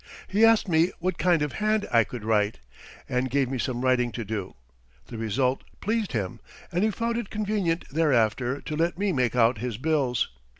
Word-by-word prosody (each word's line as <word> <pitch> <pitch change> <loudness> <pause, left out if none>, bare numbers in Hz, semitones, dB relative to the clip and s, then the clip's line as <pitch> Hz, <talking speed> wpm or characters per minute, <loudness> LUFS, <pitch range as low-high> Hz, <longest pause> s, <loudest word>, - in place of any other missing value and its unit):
He 205 +3 +2
asked 225 -2 +5
me 170 0 +3
what 180 0 -2
kind 175 -4 +3
of 150 - -3
hand 215 0 +1
I 115 -1 +5
could 120 0 -8
write, 105 -1 +1 0.5
and 130 0 -1
gave 135 0 +1
me 130 - -2
some 125 -1 -2
writing 125 -2 +2
to 115 +1 -4
do. 100 -2 -4 0.5
The 115 - -8
result 125 +4 0 0.2
pleased 215 -3 -1
him, 100 -6 -3 0.3
and 175 +3 +1
he 220 - +3
found 230 +2 -2
it 235 -4 -4
convenient 205 -5 -1
thereafter 130 -3 +1
to 155 - -5
let 165 +3 0
me 200 -1 0
make 125 -3 +1
out 115 -2 +3
his 120 -2 -3
bills. 135 -4 0
135 Hz, 195 wpm, -26 LUFS, 120-185 Hz, 0.5 s, asked